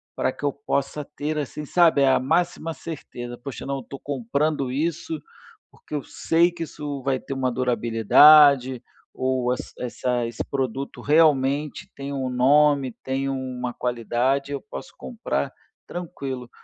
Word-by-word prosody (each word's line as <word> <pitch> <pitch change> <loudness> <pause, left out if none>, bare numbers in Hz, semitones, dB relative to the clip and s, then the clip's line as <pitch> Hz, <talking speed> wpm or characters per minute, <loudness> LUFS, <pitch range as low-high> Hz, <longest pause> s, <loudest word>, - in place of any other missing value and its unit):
pra - - 0
que - - -14
eu 145 - +2
possa 140 +1 -2
ter 150 +1 -4
assim, 150 +1 -4
sabe, 160 -3 +4
a 135 - +4
máxima 165 +4 0
certeza, 120 -7 -7
"Poxa 135 +1 -7
não, 140 0 -2
eu 135 - -7
tô 140 - -9
comprando 140 +1 -1
isso, 170 - -2 0.5
porque 150 - -9
eu 145 - -2
sei 170 +2 +2
que 170 -1 -5
isso 145 -3 -6
vai 135 -1 0
ter 135 - -6
uma 130 -1 0
durabilidade, 130 +2 +5 0.3
ou 130 -1 0 0.2
essa 125 0 -2
esse 115 0 -4
produto 135 0 -3
realmente 145 -2 +2
tem 140 0 -6
um 135 -2 -2
nome, 140 +1 +4
tem 135 +1 -1
uma 130 -2 -3
qualidade, 125 +4 -1
eu 140 - -3
posso 175 -4 -9
comprar 240 -2 -3 0.4
tranquilo", 135 -8 -6
140 Hz, 145 wpm, -24 LUFS, 130-150 Hz, 0.5 s, durabilidade